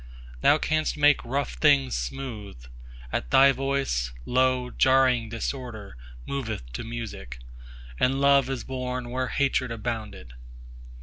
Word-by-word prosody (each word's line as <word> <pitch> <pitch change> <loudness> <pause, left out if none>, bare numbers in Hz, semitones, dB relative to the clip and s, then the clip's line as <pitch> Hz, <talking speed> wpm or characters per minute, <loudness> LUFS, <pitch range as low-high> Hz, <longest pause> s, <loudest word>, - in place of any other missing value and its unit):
15Thou - - +5
canst 155 -1 0
make 145 -1 +4
rough 140 +4 -2
things 140 -3 +3
smooth; 105 - -5 0.5
at - - -2
Thy 135 +1 +7
Voice, 135 - -1
lo, 130 0 +1
jarring 130 -3 +3
disorderMoveth 110 - -6
to - - -4
music, 115 - -7 0.6
and 135 +1 +2
Love 140 -1 +4
is 135 -2 -3
born 125 -2 -4
where 130 0 -1
hatred 135 -3 0
abounded. 110 - -5
125 Hz, 115 wpm, -26 LUFS, 110-135 Hz, 0.6 s, Thy